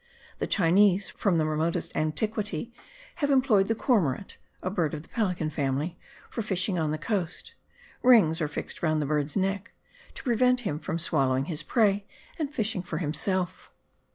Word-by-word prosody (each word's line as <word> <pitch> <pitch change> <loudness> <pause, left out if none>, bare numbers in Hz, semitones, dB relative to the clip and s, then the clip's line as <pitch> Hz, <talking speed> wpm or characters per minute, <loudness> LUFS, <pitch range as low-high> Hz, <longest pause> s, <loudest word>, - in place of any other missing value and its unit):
The - - -1
Chinese, 195 +2 +4
from 190 -5 +1
the 155 - +2
remotest 155 +2 -1
antiquity, 205 +5 -1 0.4
have 290 -4 0
employed 250 -8 +4
the 225 - +1
cormorant, 195 - 0 0.2
a 185 - -1
bird 165 -6 0
of 150 - -7
the - - -18
pelican 180 -8 -1
family, 145 +4 -2 0.3
for 230 - -4
fishing 190 -3 0
on 155 -1 0
the 155 - -1
coast: 175 0 -3 0.5
rings 190 -10 +5
are 155 - +1
fixed - - -4
round 155 -2 +1
the 150 - 0
bird's 150 0 -1
neck 195 +2 -1 0.4
to - - -8
prevent 250 0 +3
him 155 -10 -3
from 165 - -3
swallowing 135 -5 +1
his 155 -1 -1
prey 205 - +1 0.3
and 295 -3 -2
fishing 220 -8 0
for 180 - -5
himself. 180 +3 -2
180 Hz, 165 wpm, -27 LUFS, 155-215 Hz, 0.5 s, rings